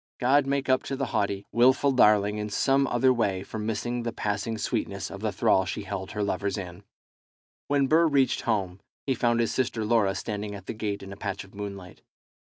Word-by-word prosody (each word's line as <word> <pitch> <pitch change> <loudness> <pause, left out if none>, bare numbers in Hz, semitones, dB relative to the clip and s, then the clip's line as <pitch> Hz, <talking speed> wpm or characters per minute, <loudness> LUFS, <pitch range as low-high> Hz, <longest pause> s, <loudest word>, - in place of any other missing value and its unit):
God 135 +2 +3
make 140 0 0
up 130 0 +3
to 135 - -3
the 135 0 -2
haughty, 100 0 -1
wilful 130 +4 +4
darling 105 -4 +4
in 105 0 -3
some 135 +6 +2
other 130 +1 +3
way 100 -6 0
for 110 - -7
missing 115 +3 -2
the 115 0 -3
passing 105 +1 -2
sweetness - - -3
of - - -7
the - - -1
thrall 95 - +3
she 95 +2 -4
held 95 0 -5
her 105 0 -1
lovers 100 +1 -1
in! 90 0 -7 0.8
When 140 -1 +2
Burr 160 +4 +4
reached 140 -3 +2
home, 100 -5 -1 0.3
he 135 - +1
found 120 -2 +1
his 115 - +1
sister 120 -4 -1
Laura 105 -3 +2
standing 105 -1 -4
at 100 -2 -10
the - - -4
gate 105 -2 -4
in 95 0 -8
a - - -11
patch 100 -1 -4
of 95 - -18
moonlight. 100 -3 -8
105 Hz, 205 wpm, -27 LUFS, 100-130 Hz, 0.8 s, wilful